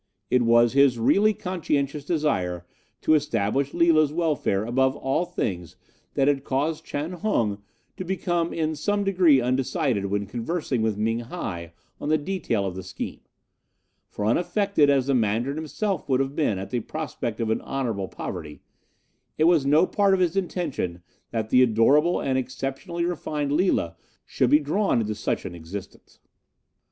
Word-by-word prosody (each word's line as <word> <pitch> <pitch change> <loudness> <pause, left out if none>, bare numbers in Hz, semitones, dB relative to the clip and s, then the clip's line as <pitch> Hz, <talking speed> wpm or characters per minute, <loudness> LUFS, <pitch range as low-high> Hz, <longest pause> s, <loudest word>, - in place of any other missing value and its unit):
"It 125 - +4
was 120 0 +4
his 140 -3 +4
really 200 - +4
conscientious 150 -7 -2
desire 95 - -1 0.4
to 155 - +3
establish 140 -3 +1
Lila's 160 -3 +4
welfare 150 - 0
above 130 +3 +1
all 135 +7 -1
things 90 - -4 0.4
that 135 - +2
had 140 -2 +2
caused 145 +4 -1
Chan 150 +4 -4
Hung 110 - 0 0.4
to - - -4
become 175 -2 -1
in 160 -1 -1
some 205 +7 0
degree 180 -8 +4
undecided 130 - 0
when 100 +1 -1
conversing 125 - -2
with 110 -2 0
Ming 115 +2 0
hi 95 - -6 0.3
on - - -4
the 155 - +4
detail 145 - -2
of 95 - -3
the 95 - -5
scheme; 95 0 -6 0.9
for, 105 - -4
unaffected 175 - +2
as 135 -2 +3
the 140 - +1
Mandarin 120 +4 0
himself 185 +5 -3
would 130 -1 +3
have 135 +1 -1
been 125 -11 +1
at 95 - -6
the 125 - 0
prospect 125 -3 -5
of 115 -1 0
an - - 0
honourable 115 -8 -3
poverty, 75 -4 -7 0.8
it 155 - +2
was 160 -4 +4
no 155 +5 +5
part 200 0 +2
of - - -2
his 180 -1 +1
intention 155 - -2 0.3
that 110 -2 -3
the 125 - +6
adorable 130 +8 +4
and 130 -1 0
exceptionally 135 +7 -4
refined 150 -4 -2
Lila 145 - +1 0.3
should - - +1
be 150 - +7
drawn 155 - +1
into 110 -1 -2
such 105 - -2
an 90 - -5
existence. 85 +4 -10
135 Hz, 160 wpm, -25 LUFS, 110-165 Hz, 0.9 s, be